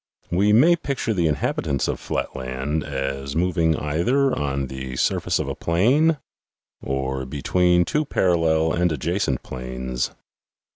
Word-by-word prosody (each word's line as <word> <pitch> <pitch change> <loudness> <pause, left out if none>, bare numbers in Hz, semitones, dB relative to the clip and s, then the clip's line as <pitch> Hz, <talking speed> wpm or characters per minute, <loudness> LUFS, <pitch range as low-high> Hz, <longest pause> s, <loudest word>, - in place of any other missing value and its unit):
We 100 +4 +3
may 150 +11 +6
picture 140 -8 -2
the 85 -5 +1
inhabitants 70 -2 -1
of - - -2
flatland 65 +4 -3
as 70 0 -4
moving 85 -2 +2
either 120 - +1
on 70 -1 -1
the 65 -1 -6
surface - - +1
of - - -2
a - - -2
plane 130 - +2 0.6
or 65 0 -2
between 90 +5 +2
two 150 - 0
parallel 80 - +2
and 90 0 +1
adjacent 80 -2 -1
planes. 65 0 -4
80 Hz, 130 wpm, -23 LUFS, 65-90 Hz, 0.6 s, may